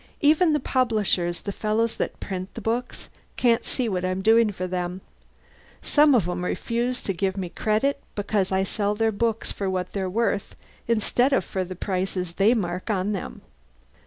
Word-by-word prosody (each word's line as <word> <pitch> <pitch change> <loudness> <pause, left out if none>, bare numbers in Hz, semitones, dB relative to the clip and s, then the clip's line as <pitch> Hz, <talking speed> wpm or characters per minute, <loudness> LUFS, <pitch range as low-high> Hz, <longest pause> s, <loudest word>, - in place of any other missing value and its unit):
"Even 315 +3 +5
the 300 - +2
publishers, 215 -10 0
the 200 - -4
fellows 215 +3 0
that - - -3
print 185 -1 -5
the - - -4
books, 235 +2 -3 0.3
can't 235 -1 +3
see 250 -3 -1
what 185 -4 -1
I'm 185 +1 -1
doing 225 0 +5
for 185 -2 -4
them. 180 0 -3 0.8
Some 295 -2 +5
of 200 -8 +2
'em 180 0 -2
refuse 240 +6 -2 0.3
me 185 -2 -3
credit 220 +10 0
because 205 -2 0
I 190 0 +2
sell 205 +1 -1
their 225 +1 +2
books 225 +1 -1
for 195 -1 -2
what 185 -1 -2
they're 190 -2 -1
worth 220 0 -1 0.3
instead 235 +3 +2
of - - +2
for 190 - -2
the 185 +1 -7
prices 185 -2 -2
they 205 +7 +4
mark 180 -2 -3
on 200 -1 0
them. 195 - -5
205 Hz, 170 wpm, -25 LUFS, 185-230 Hz, 0.8 s, Even